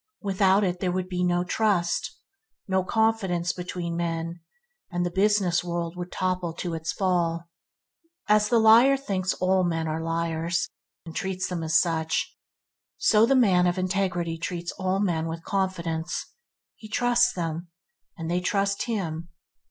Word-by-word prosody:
Without 195 Hz, 0 st, +3 dB
it 180 Hz, -2 st, -1 dB
there 180 Hz, -1 st, 0 dB
would 185 Hz, 0 st, -2 dB
be 180 Hz, -1 st, -2 dB
no 175 Hz, 0 st, +2 dB
trust, 180 Hz, -2 st, 0 dB, 0.5 s
no 190 Hz, -1 st, +1 dB
confidence 190 Hz, -5 st, +1 dB
between 175 Hz, -1 st, -4 dB
men, 170 Hz, 0 st, -3 dB, 0.5 s
and 175 Hz, -1 st, -1 dB
the 175 Hz, -, -2 dB
business 190 Hz, -2 st, +2 dB
world 170 Hz, -1 st, -3 dB
would 180 Hz, 0 st, -6 dB
topple 185 Hz, -2 st, -1 dB
to 175 Hz, 0 st, -4 dB
its 160 Hz, 0 st, -3 dB
fall. 170 Hz, -1 st, 0 dB, 0.8 s
As 210 Hz, 0 st, +4 dB
the 235 Hz, -, +4 dB
liar 230 Hz, +5 st, +6 dB
thinks 190 Hz, -8 st, -2 dB
all 185 Hz, 0 st, +2 dB
men 165 Hz, -2 st, -1 dB
are 160 Hz, +1 st, -2 dB
liars, 165 Hz, +1 st, -1 dB, 0.4 s
and 165 Hz, -, -9 dB
treats 185 Hz, -1 st, -2 dB
them 180 Hz, -2 st, -3 dB
as 160 Hz, +1 st, +3 dB
such, 165 Hz, -2 st, 0 dB, 0.6 s
so 220 Hz, +1 st, +4 dB
the 270 Hz, -, +4 dB
man 185 Hz, -8 st, +4 dB
of 175 Hz, +1 st, 0 dB
integrity 185 Hz, -3 st, -1 dB
treats 170 Hz, 0 st, -4 dB
all 185 Hz, +1 st, -1 dB
men 170 Hz, -5 st, 0 dB
with 165 Hz, 0 st, -5 dB
confidence. 175 Hz, -4 st, -2 dB, 0.5 s
He 215 Hz, -, -12 dB
trusts 245 Hz, +2 st, +3 dB
them, 170 Hz, -1 st, -4 dB, 0.5 s
and 165 Hz, -1 st, -5 dB
they 175 Hz, +2 st, 0 dB
trust 200 Hz, +1 st, 0 dB
him. 170 Hz, -8 st, -3 dB
180 Hz, 150 wpm, -26 LUFS, 170-195 Hz, 0.8 s, liar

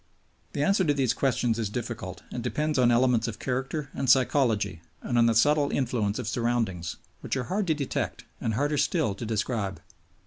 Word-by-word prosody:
The 140 Hz, -, 0 dB
answer 195 Hz, +4 st, +3 dB
to 145 Hz, -2 st, +2 dB
these 135 Hz, -4 st, +2 dB
questions 125 Hz, -4 st, +1 dB
is 110 Hz, -3 st, -1 dB
difficult 120 Hz, +3 st, -5 dB
and -, -, -4 dB
depends 150 Hz, -2 st, -1 dB
on 125 Hz, -1 st, +5 dB
elements 120 Hz, -1 st, +3 dB
of 115 Hz, -, -5 dB
character 135 Hz, +3 st, -3 dB
and 135 Hz, -, -2 dB
psychology 115 Hz, -, +3 dB, 0.2 s
and 120 Hz, -, -2 dB
on 115 Hz, -1 st, +5 dB
the 115 Hz, -, +2 dB
subtle 145 Hz, +5 st, +4 dB
influence 115 Hz, -6 st, 0 dB
of 125 Hz, -4 st, -4 dB
surroundings, 115 Hz, -9 st, -1 dB, 0.2 s
which -, -, -3 dB
are 130 Hz, -, -1 dB
hard 190 Hz, +8 st, -1 dB
to 160 Hz, -, +2 dB
detect 140 Hz, -3 st, -3 dB
and 110 Hz, -, -1 dB
harder 145 Hz, +4 st, +1 dB
still 155 Hz, -, +1 dB
to 110 Hz, +4 st, -6 dB
describe. 110 Hz, -3 st, -2 dB
125 Hz, 185 wpm, -27 LUFS, 110-140 Hz, 0.2 s, on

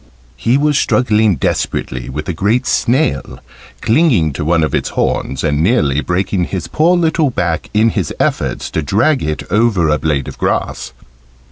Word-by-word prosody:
He 120 Hz, +3 st, +1 dB
was 145 Hz, 0 st, +2 dB
struggling 110 Hz, -5 st, +2 dB
desperately 65 Hz, -2 st, -2 dB
with 75 Hz, +3 st, -5 dB
a 90 Hz, -, -2 dB
great 110 Hz, +9 st, 0 dB
snail, 120 Hz, -, 0 dB, 0.4 s
clinging 110 Hz, -, +2 dB
to 70 Hz, -, -4 dB
one 80 Hz, +1 st, +2 dB
of 75 Hz, -, -1 dB
its -, -, -1 dB
horns, 70 Hz, +1 st, -2 dB
and 75 Hz, -1 st, +1 dB
nearly 80 Hz, -, +2 dB
breaking 90 Hz, +1 st, -1 dB
his 95 Hz, -1 st, -4 dB
poor 170 Hz, +4 st, +2 dB
little 160 Hz, -3 st, +1 dB
back 90 Hz, -8 st, -2 dB
in 110 Hz, +2 st, +3 dB
his 95 Hz, -8 st, -2 dB
efforts -, -, -1 dB
to -, -, -1 dB
drag 115 Hz, -, +1 dB
it 75 Hz, 0 st, -3 dB
over 105 Hz, -6 st, +2 dB
a 75 Hz, 0 st, +1 dB
blade 75 Hz, -4 st, -1 dB
of -, -, -9 dB
grass. 65 Hz, -, -2 dB
95 Hz, 165 wpm, -15 LUFS, 75-120 Hz, 0.4 s, in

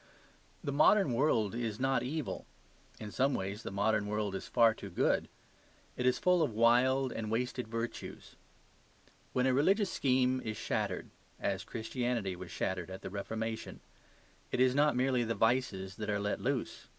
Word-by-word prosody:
The 140 Hz, -, -2 dB
modern 155 Hz, +1 st, +4 dB
world 115 Hz, -6 st, +2 dB
is 115 Hz, -3 st, -3 dB
not 135 Hz, +1 st, +2 dB
evil; 130 Hz, -6 st, -4 dB, 0.5 s
in 105 Hz, -1 st, -7 dB
some 135 Hz, +4 st, +2 dB
ways 100 Hz, +3 st, -3 dB
the -, -, -5 dB
modern 105 Hz, +1 st, +1 dB
world 105 Hz, -1 st, -1 dB
is 95 Hz, -, -5 dB
far 115 Hz, -1 st, +5 dB
too 100 Hz, -, -9 dB
good. 90 Hz, -, +1 dB, 0.7 s
It 125 Hz, -, 0 dB
is 125 Hz, -, +3 dB
full 180 Hz, -1 st, +3 dB
of 125 Hz, -9 st, 0 dB
wild 125 Hz, +3 st, +4 dB
and 110 Hz, -1 st, -4 dB
wasted 125 Hz, +1 st, -2 dB
virtues. 115 Hz, +1 st, -6 dB, 1.0 s
When 125 Hz, 0 st, +1 dB
a 130 Hz, -, +3 dB
religious 195 Hz, -, +3 dB
scheme 130 Hz, -1 st, +2 dB
is 110 Hz, -1 st, -4 dB
shattered -, -, -2 dB, 0.3 s
(as 95 Hz, -1 st, -1 dB
Christianity 115 Hz, -3 st, -2 dB
was 90 Hz, 0 st, -9 dB
shattered 90 Hz, +1 st, -3 dB
at 95 Hz, 0 st, -8 dB
the -, -, -6 dB
Reformation), 110 Hz, +3 st, -4 dB, 0.7 s
it -, -, -1 dB
is 130 Hz, 0 st, +5 dB
not 145 Hz, 0 st, +3 dB
merely 125 Hz, -1 st, +2 dB
the 115 Hz, 0 st, -1 dB
vices 115 Hz, -6 st, 0 dB
that 105 Hz, -1 st, -4 dB
are 100 Hz, -1 st, +1 dB
let 105 Hz, 0 st, -2 dB
loose. -, -, -2 dB
115 Hz, 165 wpm, -32 LUFS, 105-130 Hz, 1.0 s, far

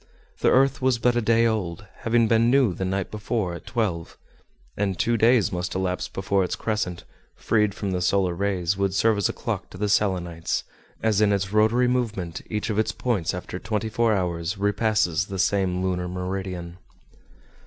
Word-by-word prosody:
The -, -, +3 dB
earth 135 Hz, +1 st, +3 dB
was 130 Hz, -2 st, +2 dB
but 120 Hz, +1 st, +2 dB
a 120 Hz, -, +2 dB
day 115 Hz, +1 st, +3 dB
old, 105 Hz, -5 st, -2 dB
having 115 Hz, 0 st, +2 dB
been 115 Hz, +1 st, +3 dB
new 130 Hz, -6 st, +4 dB
the 95 Hz, -, -3 dB
night 95 Hz, 0 st, -2 dB
before 105 Hz, -3 st, -2 dB
at 85 Hz, -, -9 dB
twelve; 100 Hz, -9 st, -2 dB, 0.6 s
and 95 Hz, -3 st, -1 dB
two 120 Hz, -, +1 dB
days 115 Hz, 0 st, +4 dB
must 90 Hz, +1 st, -3 dB
elapse 95 Hz, -1 st, -1 dB
before 95 Hz, 0 st, 0 dB
its 90 Hz, -, -2 dB
crescent, 105 Hz, -6 st, -2 dB, 0.3 s
freed 105 Hz, -3 st, +1 dB
from 100 Hz, -2 st, -3 dB
the 90 Hz, -1 st, -1 dB
solar 90 Hz, 0 st, +2 dB
rays, 95 Hz, -1 st, 0 dB
would 100 Hz, -1 st, -1 dB
serve 110 Hz, 0 st, +3 dB
as 100 Hz, -, +1 dB
a -, -, -3 dB
clock -, -, -4 dB
to -, -, -11 dB
the 105 Hz, +2 st, -1 dB
Selenites, 90 Hz, -5 st, 0 dB, 0.4 s
as 110 Hz, -2 st, +2 dB
in 105 Hz, -1 st, +4 dB
its 100 Hz, 0 st, -1 dB
rotary 110 Hz, +4 st, +4 dB
movement 110 Hz, -9 st, -2 dB
each 105 Hz, 0 st, -2 dB
of 105 Hz, -, 0 dB
its 110 Hz, -, +1 dB
points 105 Hz, -10 st, -1 dB
after 90 Hz, 0 st, -6 dB
twenty 110 Hz, +1 st, -2 dB
four 115 Hz, +1 st, +2 dB
hours 90 Hz, -2 st, -1 dB
repasses 100 Hz, -2 st, +1 dB
the 95 Hz, -, -5 dB
same 95 Hz, -1 st, +1 dB
lunar 90 Hz, -1 st, -1 dB
meridian. 90 Hz, -1 st, -5 dB
100 Hz, 185 wpm, -24 LUFS, 90-110 Hz, 0.6 s, new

